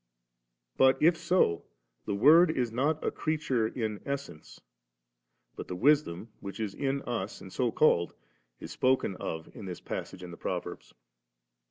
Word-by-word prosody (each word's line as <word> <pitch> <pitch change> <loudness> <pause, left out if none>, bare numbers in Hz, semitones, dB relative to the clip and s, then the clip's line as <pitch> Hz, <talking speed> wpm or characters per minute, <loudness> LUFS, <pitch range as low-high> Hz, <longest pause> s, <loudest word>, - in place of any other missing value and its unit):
But 130 0 +5
if 165 +2 +5
so, 165 - +1 0.4
the 100 - -2
Word 155 - +7
is 125 -7 -1
not 145 +6 0
a - - +1
creature 150 -7 0
in 110 -3 -3
essence'^; 140 - -6 1.0
but - - -7
the 90 - -5
wisdom 120 - +2
which 100 +2 -8
is 105 -3 -3
in 140 +2 -2
us 110 -5 -4
and 95 - -11
so 125 -2 0
called, 85 - +3 0.4
is - - -8
spoken 130 -7 +1
of 80 0 -6
in - - -8
this 90 -2 -6
passage 90 - -6
in 90 - -8
the 85 - -10
Proverbs. - - -5
120 Hz, 155 wpm, -29 LUFS, 95-140 Hz, 1.0 s, Word